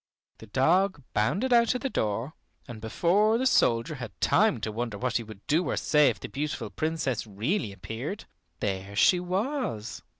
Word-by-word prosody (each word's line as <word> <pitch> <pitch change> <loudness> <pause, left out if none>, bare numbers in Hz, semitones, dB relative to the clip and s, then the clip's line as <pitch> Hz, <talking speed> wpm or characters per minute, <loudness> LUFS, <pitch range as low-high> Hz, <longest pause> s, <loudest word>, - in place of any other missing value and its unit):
The 110 - -12
dog 165 - +2
bounded 200 - +1
out 235 0 +4
of 250 - -3
the 275 - -1
door, 110 +7 -1 0.3
and 115 -4 -9
before 195 - +2
the 260 - -1
soldier 120 - +3
had 125 -5 -8
time 215 - +3
to 110 - -2
wonder 115 -1 -3
what 125 +2 0
he 120 - -4
would 110 -2 -13
do 165 +3 +1
or - - -1
say 150 -2 +4
if 110 -5 -4
the - - -6
beautiful 140 -6 -4
Princess 155 -8 -2
really 110 - -1
appeared, 115 - -6 0.4
there 95 0 -3
she 180 - +5
was. 185 - -3
130 Hz, 175 wpm, -27 LUFS, 110-185 Hz, 0.4 s, she